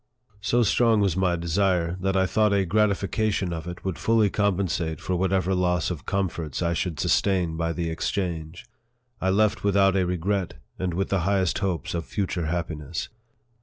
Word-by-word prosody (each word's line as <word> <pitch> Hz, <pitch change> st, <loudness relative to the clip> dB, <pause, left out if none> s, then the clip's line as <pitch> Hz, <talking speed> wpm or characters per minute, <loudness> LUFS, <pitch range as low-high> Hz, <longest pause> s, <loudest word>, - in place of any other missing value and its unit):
So 120 Hz, +4 st, +2 dB
strong 115 Hz, +1 st, +3 dB
was 100 Hz, -5 st, +2 dB
my 90 Hz, -2 st, +2 dB
desire, 85 Hz, 0 st, +1 dB
that 95 Hz, 0 st, +1 dB
I 95 Hz, -, +3 dB
thought 105 Hz, +2 st, +2 dB
a 100 Hz, -1 st, +2 dB
gratification 100 Hz, -1 st, +1 dB
of 80 Hz, 0 st, -6 dB
it 90 Hz, +1 st, -8 dB
would 90 Hz, -6 st, -3 dB
fully 110 Hz, +1 st, +3 dB
compensate 90 Hz, -6 st, 0 dB
for 90 Hz, -, -2 dB
whatever 95 Hz, +1 st, +1 dB
loss 90 Hz, -1 st, +1 dB
of 85 Hz, -, -7 dB
comforts 90 Hz, -6 st, -2 dB
I 85 Hz, 0 st, +1 dB
should 85 Hz, -1 st, -2 dB
sustain 90 Hz, -5 st, +1 dB
by 85 Hz, 0 st, -1 dB
the 85 Hz, +1 st, -2 dB
exchange. 85 Hz, -1 st, -3 dB, 0.6 s
I 95 Hz, -, +1 dB
left 105 Hz, +2 st, +2 dB
without 100 Hz, -1 st, +3 dB
a 95 Hz, -, +3 dB
regret, 90 Hz, +1 st, -1 dB, 0.2 s
and 90 Hz, -2 st, -2 dB
with 95 Hz, +2 st, -1 dB
the 100 Hz, -, +1 dB
highest 95 Hz, -1 st, +1 dB
hopes 95 Hz, -4 st, -2 dB
of 85 Hz, -2 st, -3 dB
future 90 Hz, +2 st, -2 dB
happiness. 80 Hz, -2 st, -3 dB
95 Hz, 170 wpm, -25 LUFS, 85-100 Hz, 0.6 s, strong